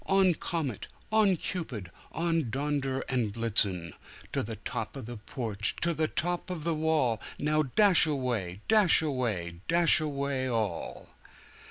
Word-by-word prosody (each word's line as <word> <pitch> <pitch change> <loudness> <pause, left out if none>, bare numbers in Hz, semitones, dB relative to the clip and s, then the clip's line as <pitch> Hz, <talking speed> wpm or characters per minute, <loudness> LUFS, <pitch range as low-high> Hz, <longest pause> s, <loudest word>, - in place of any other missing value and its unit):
On, 195 -2 +4
Comet! 155 - -3 0.2
On 210 -4 +4
Cupid! 125 - -5 0.2
On, 165 -5 0
Donder 135 0 -1
and 125 -5 0
Blitzen! 100 -7 +1 0.4
To - - +1
the - - -5
top - - -5
of - - -7
the 120 +1 -7
porch! 110 -2 -2
to 170 0 +2
the 155 0 0
top 175 +3 -2
of 175 -4 -4
the 170 +1 0
wall! 155 -7 +1 0.2
Now 155 +1 +1
dash 175 - +4
away! 120 - -2
dash 210 -7 +5
away! 105 - -2
dash 170 0 +5
away 140 -3 -1
all!" 110 -8 -3
140 Hz, 145 wpm, -29 LUFS, 115-165 Hz, 0.4 s, dash